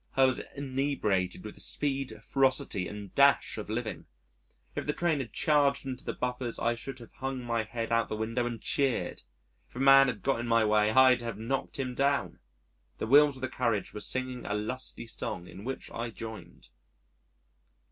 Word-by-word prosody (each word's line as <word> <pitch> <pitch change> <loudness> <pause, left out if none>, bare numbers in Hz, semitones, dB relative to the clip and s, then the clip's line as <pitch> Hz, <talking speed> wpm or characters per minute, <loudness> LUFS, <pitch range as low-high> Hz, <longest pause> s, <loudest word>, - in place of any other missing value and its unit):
I 135 - +7
was 130 - +1
inebriated 130 -10 -1
with 105 - -7
the - - -1
speed, 135 -6 +2
ferocity, 130 -8 +1
and 105 -1 -8
dash 140 -4 +4
of 105 - -7
living.... 110 -4 -4 0.7
If - - -4
the 150 - +1
train 165 -3 +1
had 130 -4 -5
charged 145 -3 +2
into 130 -1 -5
the - - -3
buffers 125 -1 -3
I 115 - +1
should 125 +3 -7
have 120 -2 -13
hung 135 -1 -4
my 115 -1 0
head 115 +1 -5
out 115 0 +3
of - - -21
the - - -2
window 115 +3 -1
and 120 -2 -5
cheered. 135 +2 0 0.5
If - - -25
a - - -5
man 135 0 +7
had 110 -6 -3
got 135 -3 +1
in 120 - -3
my 115 -1 +3
way, 105 0 +3
I'd 130 +1 +5
have 115 -3 -5
knocked 125 +5 -3
him 130 -2 -3
down. 140 +2 0 0.6
The - - -3
wheels 145 +3 +5
of - - -12
the 130 - -1
carriage 120 -5 -1
were - - -5
singing 130 +3 -2
a 105 - -1
lusty 120 +3 -4
song 90 -5 -4
in 95 +2 -11
which 135 +3 -6
I 115 0 -4
joined. 110 -4 -10
125 Hz, 195 wpm, -29 LUFS, 110-135 Hz, 0.7 s, I